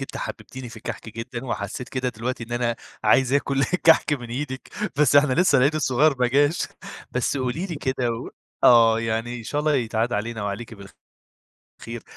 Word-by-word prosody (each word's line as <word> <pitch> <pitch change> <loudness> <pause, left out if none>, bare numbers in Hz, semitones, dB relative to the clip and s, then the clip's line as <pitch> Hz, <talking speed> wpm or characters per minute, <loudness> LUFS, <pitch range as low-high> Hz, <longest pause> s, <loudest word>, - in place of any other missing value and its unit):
أنتِ 135 - -6
حبّبتيني 130 -1 -7
في 115 - -12
الكَحك 110 - -7
جدًا 120 +2 -6
وحسّيت 110 +1 -4
كده 130 -1 -2
دلوقتي 120 +1 -4
إن 120 - -10
أنا 120 -1 0 0.3
عايز 130 -1 +4
آكُل 140 -1 +2
كَحك 165 -3 +3
من 120 -5 -3
إيدِك 130 +1 -5 0.3
بس 145 -1 +4
إحنا 145 -2 +5
لسّه 170 -6 +4
العيد 140 +4 +3
الصغير 150 0 +3
ما 125 - +3
جاش، 145 +5 +2 0.4
بس 125 +3 -1
قولي 130 +8 -2
لي 170 - -5
كده 130 -3 -1
و 115 - -5 0.3
آه. 115 -2 +6
يعني 115 +2 -2
إن - - -8
شاء 145 +6 -2
الله 150 -1 +2
يتعاد 115 -1 0
علينا 110 +1 -2
وعليكِ 105 +3 -5
بالخ 100 -1 -12 0.9
خير. 115 -1 -7
125 Hz, 185 wpm, -24 LUFS, 115-140 Hz, 0.9 s, آه